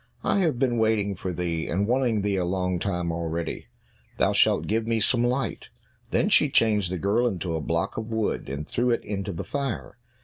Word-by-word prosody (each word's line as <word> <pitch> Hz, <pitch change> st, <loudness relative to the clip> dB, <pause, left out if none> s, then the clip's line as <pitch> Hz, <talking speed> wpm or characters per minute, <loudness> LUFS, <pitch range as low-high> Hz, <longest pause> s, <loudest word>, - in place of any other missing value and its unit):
I -, -, +2 dB
have 160 Hz, -9 st, +1 dB
been 120 Hz, -2 st, +1 dB
waiting 110 Hz, -2 st, +2 dB
for 95 Hz, +1 st, -4 dB
thee, 85 Hz, -2 st, -2 dB
and 95 Hz, +4 st, 0 dB
wanting 120 Hz, -4 st, +1 dB
thee 100 Hz, -1 st, +1 dB
a 90 Hz, -, +1 dB
long 90 Hz, 0 st, -1 dB
time 90 Hz, -3 st, -1 dB
already; 85 Hz, 0 st, -3 dB, 0.5 s
thou -, -, +2 dB
shalt -, -, +3 dB
give 110 Hz, +1 st, 0 dB
me 115 Hz, -1 st, +1 dB
some 120 Hz, +2 st, +2 dB
light." 125 Hz, +1 st, -1 dB, 0.4 s
Then -, -, +2 dB
she -, -, +4 dB
changed 105 Hz, -5 st, +2 dB
the 95 Hz, -, -1 dB
girl 105 Hz, +8 st, +2 dB
into 90 Hz, -6 st, -2 dB
a 80 Hz, -, -2 dB
block -, -, -1 dB
of 110 Hz, 0 st, -3 dB
wood, 110 Hz, -, -2 dB
and 70 Hz, +3 st, -5 dB
threw 125 Hz, +1 st, 0 dB
it 120 Hz, -, 0 dB
into 100 Hz, -1 st, -3 dB
the 85 Hz, -, -5 dB
fire. 140 Hz, -3 st, -4 dB
105 Hz, 205 wpm, -26 LUFS, 90-115 Hz, 0.5 s, she